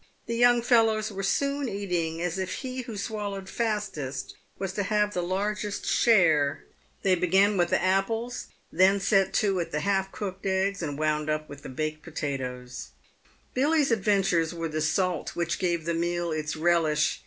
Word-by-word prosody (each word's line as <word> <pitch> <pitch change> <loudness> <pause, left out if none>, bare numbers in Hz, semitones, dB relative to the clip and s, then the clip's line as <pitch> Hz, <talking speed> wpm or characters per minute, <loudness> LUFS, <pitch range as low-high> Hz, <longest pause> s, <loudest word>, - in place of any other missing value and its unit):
The 235 - -3
young 240 0 +4
fellows 225 -3 +3
were 195 -1 -5
soon 280 +7 0
eating 175 -5 -2
as 175 +2 -2
if 190 -1 -2
he 255 0 -3
who 235 -3 -7
swallowed 200 -2 -4
fastest 200 - -3 0.2
was 190 -1 -3
to 205 - -1
have 210 +1 +1
the 180 - -1
largest 205 +3 -2
share. 160 -11 +3 0.4
They 190 - +4
began 190 +4 +3
with 175 -2 +2
the - - +2
apples, 225 +6 0 0.2
then 190 +3 +4
set 195 0 +3
to 195 -3 +2
at 170 - -3
the 150 - -1
half 195 +1 0
cooked 195 -1 -5
eggs, 190 +1 0
and 145 -4 -3
wound 155 0 0
up 155 0 -1
with 140 -2 -10
baked 155 +1 -2
potatoes. 130 - -5 0.6
Billy's 290 +1 +2
adventures 195 -6 +2
were 165 -1 -3
the 155 0 -2
salt 180 +2 0
which 170 0 -1
gave 170 -3 0
the 170 - 0
meal 170 0 -1
its 155 0 -2
relish. 160 -2 +2
190 Hz, 165 wpm, -27 LUFS, 160-210 Hz, 0.6 s, young